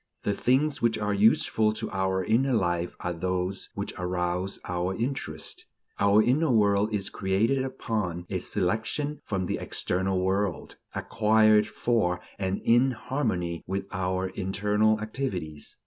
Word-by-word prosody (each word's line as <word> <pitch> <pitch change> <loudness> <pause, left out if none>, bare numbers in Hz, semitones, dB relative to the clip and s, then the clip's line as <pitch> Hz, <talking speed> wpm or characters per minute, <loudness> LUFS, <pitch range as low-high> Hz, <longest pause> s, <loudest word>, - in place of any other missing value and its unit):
The 100 - +1
things 135 +7 +1
which 115 -1 +2
are 105 -1 -1
useful 110 +1 +3
to 110 - -4
our 95 -1 0
inner 125 +7 +2
life 85 -5 0
are 90 - -2
those 90 +2 -2
which - - -4
arouse 90 +1 -1
our 90 +1 -1
interest. 115 - -4 0.3
Our 100 +2 +5
internal 135 +2 +2
world 100 0 +3
is 100 -2 -2
created 110 +8 +1
upon 105 -9 -3
a 95 - -2
selection 110 - -1
from 95 -3 -2
the - - -2
external 95 +1 0
world, 95 0 -1 0.2
acquired 110 -1 +4
for 100 -7 0 0.2
and 95 0 -1
in 120 +3 +4
harmony 95 - -2
with 95 +1 -2
our 95 0 -1
internal 105 +3 +1
activities. 95 - -4
100 Hz, 135 wpm, -27 LUFS, 90-110 Hz, 0.3 s, Our